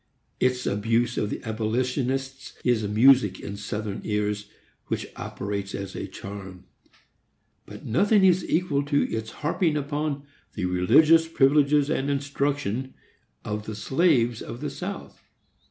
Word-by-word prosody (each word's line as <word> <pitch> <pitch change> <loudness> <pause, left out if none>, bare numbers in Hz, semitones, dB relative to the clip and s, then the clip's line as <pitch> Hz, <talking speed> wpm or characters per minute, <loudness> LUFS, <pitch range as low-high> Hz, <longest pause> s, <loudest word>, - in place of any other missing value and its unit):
Its 125 0 +1
abuse 115 +3 +1
of 105 - -1
the - - -5
abolitionists 130 +4 -2
is 115 -4 +2
music 110 -1 +5
in 100 - -6
Southern 105 0 -4
ears, 105 -1 -2 0.4
which - - -2
operates 100 -1 -4
as 100 -1 -6
a - - -4
charm. 95 -2 -9 1.0
But - - -11
nothing 200 - +3
is 185 -1 +4
equal 160 -5 +1
to 145 0 +2
its 110 0 -3
harping 155 - 0
upon 145 0 -2 0.3
the 100 - -2
"religious 145 - +5
privileges 145 -1 +3
and 135 +2 0
instruction" 140 -3 -2 0.5
of 105 0 -4
the 110 - -4
slaves 120 - +2
of 120 - -7
the - - -4
South. - - -7
125 Hz, 130 wpm, -25 LUFS, 105-145 Hz, 1.0 s, music